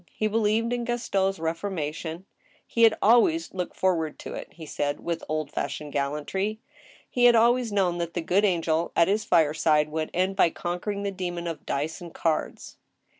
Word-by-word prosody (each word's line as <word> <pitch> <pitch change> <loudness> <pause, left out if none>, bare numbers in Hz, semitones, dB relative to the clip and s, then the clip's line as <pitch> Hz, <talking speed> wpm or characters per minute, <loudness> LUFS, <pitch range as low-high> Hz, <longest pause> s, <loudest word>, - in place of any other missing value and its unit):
He 215 - -1
believed 220 +2 +1
in 240 -1 -1
Gaston's 200 -5 0
reformation. 165 0 -4 0.4
He 230 - -2
had 225 -1 +7
always 245 - +4
looked 180 -2 -4
forward 165 -5 0
to - - -8
it, - - -7
he 165 - -10
said, 145 -1 -2
with 170 -1 -3
old 155 -2 -2
fashioned 150 -2 -4
gallantry. 150 +10 -2 0.5
He 245 -1 +2
had 240 -1 +7
always 235 0 +3
known 185 -4 +1
that 170 0 -4
the 175 - 0
good 185 +5 +2
angel 170 -4 +1
at 170 - +5
his 210 +2 0
fireside 155 -3 +3
would 155 0 -3
end 185 +2 0
by 190 - +4
conquering 180 +5 -4
the 200 - -1
demon 175 -2 -4
of 165 -2 -6
dice 150 +5 -2
and 170 -1 -9
cards. 160 -2 -2
180 Hz, 175 wpm, -26 LUFS, 160-210 Hz, 0.5 s, had